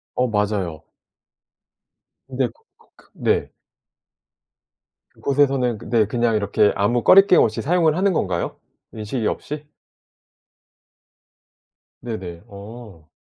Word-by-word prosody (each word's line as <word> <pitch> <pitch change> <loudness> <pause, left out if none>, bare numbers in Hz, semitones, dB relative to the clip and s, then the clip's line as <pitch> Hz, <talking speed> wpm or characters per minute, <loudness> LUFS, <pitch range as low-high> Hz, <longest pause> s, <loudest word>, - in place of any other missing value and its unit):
어 125 - +1
맞아요. 105 -7 -2 1.4
근데 130 -1 -1
그 - - -19
그 - - -27
그 - - -24
네. - - -1 1.6
그곳에서는 135 -4 0
근데 110 +1 +1
그냥 120 0 0
이렇게 105 0 +2
아무 115 +4 +1
거리낌 195 -1 +7
없이 110 -1 +1
사용을 165 0 +2
하는 195 +1 +2
건가요, 90 - -2 0.4
인식이 110 +1 -3
없이? 150 0 -5 2.4
네네 95 -8 -7
어. 100 -5 -12
115 Hz, 205 characters per minute, -21 LUFS, 100-135 Hz, 2.4 s, 거리낌